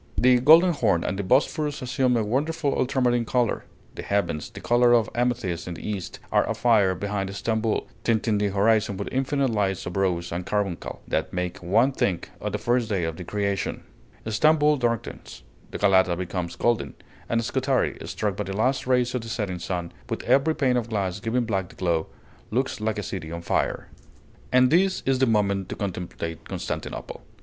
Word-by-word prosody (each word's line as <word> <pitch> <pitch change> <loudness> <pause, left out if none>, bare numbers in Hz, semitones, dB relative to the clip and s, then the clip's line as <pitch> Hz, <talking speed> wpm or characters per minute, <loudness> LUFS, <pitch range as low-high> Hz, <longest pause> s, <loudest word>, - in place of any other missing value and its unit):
The 125 0 +5
Golden 165 +7 +7
Horn 100 - +1
and 95 - -2
the - - -1
Bosphorus 145 +6 +1
assume 125 0 +1
a 115 - +1
wonderful 145 +6 0
ultramarine 125 -2 +1
color; 120 0 0 0.3
the - - -6
heavens, 85 -7 -1
the - - -10
color 120 0 +4
of 115 -3 +3
amethyst 120 -9 -1
in 90 - -4
the - - -8
East, 100 -4 -4
are - - +4
afire 105 -6 +3
behind 100 +1 -3
Stamboul, 110 +1 -1 0.2
tinting 110 -2 +1
the 105 - +1
horizon 100 0 +2
with 100 - -4
infinite 135 0 0
lights 100 -4 -1
of 90 - -5
rose 90 -3 0
and 85 +2 -3
carbuncle, 100 -2 -3
that 80 - -1
make 90 -1 -3
one 110 +9 +3
think 95 -9 -1
of 105 - -3
the 105 - -1
first 120 +1 0
day 95 -5 0
of 80 -1 -2
the 90 - -6
creation; 100 +1 -2 0.4
Stamboul 150 +6 +3
darkens, 115 -4 -3 0.3
Galata 95 -3 +3
becomes 90 -1 -4
golden, 120 -2 0 0.3
and 115 -1 +1
Scutari, 130 +1 0
struck 105 -3 -2
by 105 - -3
the 95 +1 -4
last 130 +4 +1
rays 125 -1 +2
of 125 - -1
the 115 - -8
setting 105 -6 -3
sun, 85 -1 -4 0.2
with - - -3
every 155 +4 +3
pane 130 -3 +2
of 120 -1 -2
glass 100 -3 -2
giving 115 +4 0
back 95 -5 -2
the - - -15
glow, 85 -3 0 0.4
looks 125 -1 -1
like 110 -1 -1
a 105 - -3
city 80 -3 -5
on 85 0 -6
fire. - - -1 0.6
And 125 0 +5
this 190 +3 +3
is 135 -1 +2
the 130 - +3
moment 100 -3 +1
to - - -4
contemplate 90 -4 -5
Constantinople. - - -5
110 Hz, 185 wpm, -25 LUFS, 95-125 Hz, 0.6 s, Golden